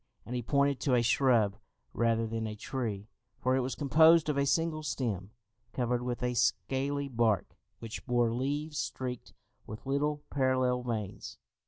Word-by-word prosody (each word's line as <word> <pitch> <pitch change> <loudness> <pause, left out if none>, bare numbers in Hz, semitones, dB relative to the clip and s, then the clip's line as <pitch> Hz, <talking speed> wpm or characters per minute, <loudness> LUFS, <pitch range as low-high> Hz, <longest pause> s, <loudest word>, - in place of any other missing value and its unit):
and 125 - -5
he 125 - -1
pointed 140 +2 +1
to 130 -4 +2
a 120 - +3
shrub, 115 -5 +3 0.4
rather 115 -1 +1
than 110 0 -3
a 105 - -5
tree, 105 -3 -4 0.3
for 130 +1 +1
it - - +2
was 130 0 -2
composed 160 +3 +5
of 150 - +1
a 140 0 +1
single 165 +1 +1
stem, 110 -10 -3 0.4
covered 125 -1 0
with 125 0 -3
a 125 0 0
scaly 130 +5 0
bark, 115 -6 0 0.2
which 115 -1 -7
bore 120 -2 +2
leaves 145 +5 -2
streaked 125 -2 -5 0.3
with 110 +4 -8
little 145 +2 0
parallel 130 -2 +1
veins. 110 -5 -5
125 Hz, 160 wpm, -31 LUFS, 115-140 Hz, 0.4 s, composed